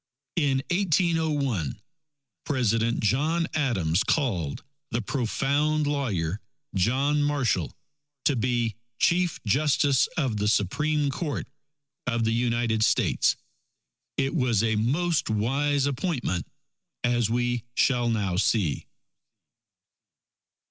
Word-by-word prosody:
In 135 -4 +2
1801, 155 - +1 0.7
President 115 -4 +1
John 155 +10 +1
Adams 95 - +1
called 95 - -1 0.3
the 115 - -1
profound 140 +6 0
lawyer, 105 - -1 0.3
John 135 +9 +2
Marshall, 130 - 0 0.5
to 145 - +3
be 120 -1 0 0.2
Chief 175 +3 +2
Justice 140 +3 +3
of 130 -9 0
the 105 0 0
Supreme 145 - +1
Court 150 0 -3 0.6
of 115 -2 0
the 115 0 +1
United 115 -2 +1
States. - - +2 0.8
It 135 0 0
was 125 - +2
a 110 -1 +1
most 150 +10 +1
wise 135 +6 +1
appointment, 135 - -2 0.6
as 120 -2 +2
we 120 0 0
shall 120 -3 +2
now 100 -6 0
see. 95 -5 +1
125 Hz, 100 wpm, -26 LUFS, 110-145 Hz, 0.8 s, to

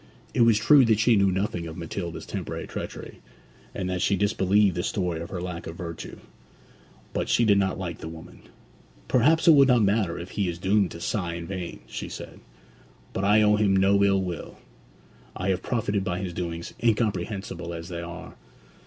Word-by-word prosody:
It - - +2
was 115 -2 +5
true 135 +7 +6
that 110 -2 +3
she 115 +1 +4
knew 100 -1 +3
nothing 95 -3 -2
of 80 - -8
Matilda's 85 0 -5
temporary - - -5
treachery, - - -7 0.6
and 95 -2 -3
that 90 -1 -2
she 100 - +2
disbelieved 100 0 +2
the 90 - -1
story 90 -5 -2
of 85 - -7
her 90 - -4
lack 90 -1 -6
of 80 - -7
virtue; 85 -2 -7 1.0
but - - -2
she 120 - +3
did 100 -2 +4
not 95 -1 0
like 85 -3 -5
the - - -7
woman. 80 0 -11 0.7
'Perhaps 155 +8 +3
it - - +10
will 140 -3 +7
not 125 -4 +4
matter 100 -4 +1
if 90 +2 -7
he 100 -4 -1
is 85 - -4
doomed 95 +1 +2
to 85 - -9
sigh 85 -1 -2
in 85 -1 -6
vain,' 90 -2 -6
she - - -6
said. - - -9 0.7
'But 95 - -1
I 105 +2 +5
owe 105 0 +4
him 100 -2 +3
no 100 +1 +4
ill 100 -1 +3
will. 90 -3 -6 0.8
I 90 - -2
have 95 -1 0
profited 105 -4 -1
by 90 -2 -2
his 95 -1 -4
doings, 85 -1 -5
incomprehensible 100 -5 -1
as 85 +1 -7
they 85 -1 -5
are.' 90 +1 -8
95 Hz, 195 wpm, -26 LUFS, 85-105 Hz, 1.0 s, it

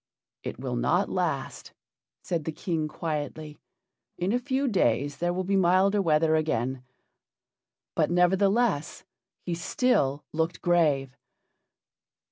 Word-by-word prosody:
"It - - -6
will - - -3
not - - +1
last," - - -3 0.5
said 165 -4 -2
the 160 - -2
King, 160 -1 -2
quietly. 150 -1 -5 0.6
"In 180 +3 -1
a 245 - +2
few 265 +2 -1
days 145 - +1
there 175 +3 0
will 185 +1 -2
be 195 +2 0
milder 190 +2 +3
weather 160 -2 +3
again." 130 -5 -1 1.1
But, - - +2
nevertheless, 190 +1 +2 0.4
he 175 - -3
still 165 - 0
looked 165 +2 -1
grave. 150 -7 +2
170 Hz, 115 wpm, -27 LUFS, 150-190 Hz, 1.1 s, milder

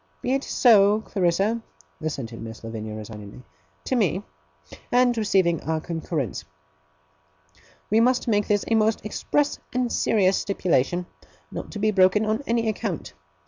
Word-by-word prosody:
'Be 255 - 0
it 275 +1 0
so, 210 -3 +5
Clarissa!' 195 +3 0 0.4
assented 130 -7 -5
Miss 110 0 -9
Lavinia 110 -1 -6
resignedly 105 +2 -9 0.4
'to - - -1
me - - +1 0.7
and 245 0 +4
receiving 190 -7 +2
our 160 0 -1
concurrence. 160 - -3 1.5
We 220 - +5
must 250 +2 +2
make 205 -3 +2
this 205 -1 +1
a - - +2
most 220 0 +2
express 290 +7 0 0.2
and 250 -1 0
serious 195 -3 +2
stipulation, 175 -3 0 0.5
not - - -6
to - - -5
be 215 +1 +2
broken 195 +2 +4
on 215 +3 0
any 230 -1 +1
account. 210 - -3
200 Hz, 140 wpm, -24 LUFS, 155-220 Hz, 1.5 s, so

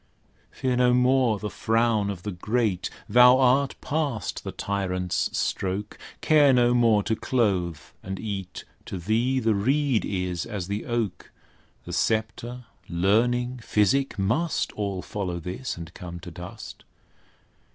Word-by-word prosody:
Fear 130 -1 -1
no 125 0 +4
more 125 -3 +3
the 105 0 -5
frown 115 -2 +1
of 90 -3 -6
the 105 - -3
great, 105 +1 -1 0.2
Thou 125 +3 +7
art 135 +1 +3
past 145 -7 -2
the - - -5
tyrant's 90 -3 -1
stroke: 95 +2 -2 0.3
Care 150 -3 +5
no 120 -1 +4
more 115 -4 +4
to 110 - 0
clothe 95 -10 0 0.2
and 95 0 -6
eat; 100 -4 -5 0.2
To - - -4
thee 115 +8 +1
the 110 -2 +2
reed 130 +4 +1
is 90 -3 -2
as 95 -4 -4
the 100 +2 -4
oak: 120 -5 -3 0.5
The - - -7
sceptre, 115 +3 -1 0.2
learning, 120 +8 +1
physic, 115 +6 +1
must 120 - 0
All 100 -3 -3
follow 90 -5 -4
this, 90 +9 -5
and 85 +1 -9
come 85 -1 -8
to 90 - -9
dust. 90 +2 -9
110 Hz, 140 wpm, -25 LUFS, 95-125 Hz, 0.5 s, Thou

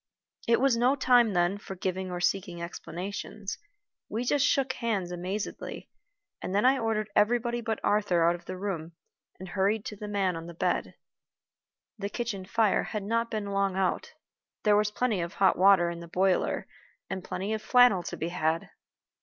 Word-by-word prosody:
It 230 - +4
was 270 -2 +3
no 245 +4 +3
time 245 -5 +4
then 175 +3 +1
for 195 - -8
giving 185 0 -3
or 180 -1 -4
seeking 180 -1 -1
explanations. 190 +4 -6 0.5
We 230 +3 -2
just 285 +2 +2
shook 275 -2 +2
hands 200 -7 -2
amazedly, 185 +4 -5 0.5
and 185 - -3
then 205 - +3
I 265 +1 +5
ordered 215 -2 -1
everybody 240 +2 +2
but 220 -2 -2
Arthur 205 -5 +2
out 170 - +4
of 175 - -9
the 185 - -6
room, 175 -4 -4 0.5
and 190 0 -8
hurried 200 +3 0
to 210 - -5
the 210 +1 -7
man 195 -3 0
on 165 0 -7
the 170 - -9
bed. - - -1 1.0
The 200 0 -3
kitchen 215 -5 -4
fire 220 +1 +2
had 210 -2 -4
not 230 +3 0
been 210 -2 -3
long 195 -1 +1
out. 195 - -1 0.5
There 210 -1 +5
was 210 0 +3
plenty 215 -3 0
of 170 +2 -5
hot 195 -1 +4
water 185 -2 +5
in 170 - -7
the 170 - -9
boiler, 185 +2 +1 0.4
and 190 - -5
plenty 195 +4 -3
of 220 - -2
flannel 245 -4 +5
to 175 - -6
be 165 - -2
had. 165 -1 -1
200 Hz, 180 wpm, -28 LUFS, 180-225 Hz, 1.0 s, I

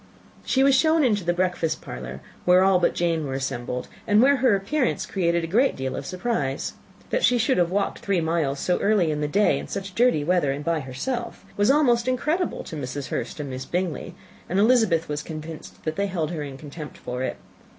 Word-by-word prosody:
She 265 - +2
was 275 0 +5
shown 315 +3 +4
into 210 -7 +2
the 175 - +1
breakfast 175 -3 0
parlour, 60 +1 -7 0.2
where 180 +1 +5
all 190 -1 +4
but 175 - +2
Jane 165 -3 0
were 135 - -3
assembled, 125 -2 -3 0.2
and 205 0 +5
where 275 +4 +5
her 250 -4 +4
appearance 195 -1 0
created 170 -3 0
a 165 +2 -5
great 255 +5 +3
deal 130 0 -3
of 140 - -5
surprise. 180 - -2 0.4
That - - 0
she 250 - +5
should 230 -1 +2
have 175 -1 +3
walked 195 +2 -1
three 195 -3 0
miles 160 -4 0
so 180 - +1
early 200 -6 +2
in 150 0 -2
the 150 - 0
day 205 +8 +2
in - - -7
such 195 -1 -5
dirty 235 -9 +3
weather, 175 -3 +2
and 145 +2 -5
by 165 -1 +1
herself, 235 - -4
was 205 +3 +2
almost 255 -5 +3
incredible 300 +8 0
to - - -8
Mrs. 140 -1 -5
Hurst - - -4
and 140 -2 -4
Miss 130 +1 -5
Bingley; 180 +1 -3 0.3
and 185 - 0
Elizabeth 210 -7 +3
was 150 0 -3
convinced 155 0 -9
that 155 0 -3
they 200 - +1
held 170 -4 -2
her 165 -3 -4
in 140 -2 -6
contempt 150 +1 -9
for 125 +1 -5
it. 130 - -2
175 Hz, 215 wpm, -24 LUFS, 150-220 Hz, 0.4 s, was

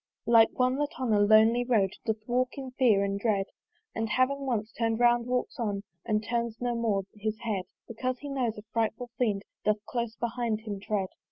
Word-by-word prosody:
Like 230 -1 +6
one, 255 +1 +2
that 290 -1 -2
on 250 -4 +1
a 205 - +4
lonely 220 +3 +5
road 220 -6 +2 0.2
Doth 220 -1 -1
walk 255 +2 0
in 265 -2 -6
fear 235 -6 +3
and 200 0 -1
dread, 200 -3 +1 0.5
And 225 0 -2
having 270 +4 +1
once 220 -3 -1
turn'd 225 0 -1
round, 240 0 +4
walks 250 +1 -2
on 205 -4 -1 0.2
And 215 -1 +1
turns 235 -1 -1
no 245 0 -1
more 220 -4 0
his 215 0 -3
head: 205 -5 -2 0.2
Because 255 +3 -2
he 290 - -8
knows, 250 -5 -1
a 210 - -8
frightful 230 +1 -1
fiend 210 -5 +1 0.2
Doth 210 0 0
close 235 -2 -2
behind 235 -2 -2
him 210 -3 -5
tread. 195 -2 -2
230 Hz, 195 wpm, -29 LUFS, 215-245 Hz, 0.5 s, Like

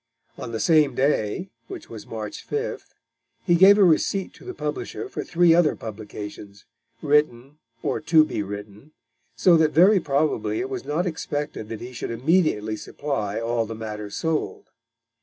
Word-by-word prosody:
On 115 - -7
the 115 - -3
same 150 -4 +3
day, 135 - 0 0.2
which 380 -2 -9
was - - -10
March - - -6
5th, 440 +2 -3 0.6
he 175 - +3
gave 190 +4 +7
a 205 - +6
receipt 185 +2 +2
to - - -17
the 375 -1 -7
publisher 425 - -4
for - - -5
three 170 -1 +4
other 170 -3 +3
publications, 105 -2 -9 0.4
written 145 -2 +1 0.2
or - - -1
to 155 0 +5
be 105 - -3
written, 105 +7 -8 0.4
so 175 -3 +5
that 155 -1 +2
very 190 +5 +6
probably 150 - 0
it 390 +2 -4
was 385 -2 -5
not 160 +5 -1
expected 145 - -4
that 115 -2 -6
he 125 +1 -8
should 120 - -5
immediately 115 - +1
supply 110 -9 -3
all 115 0 -1
the 115 - -6
matter 105 -1 -6
sold. 160 +9 -3
150 Hz, 160 wpm, -24 LUFS, 110-175 Hz, 0.6 s, gave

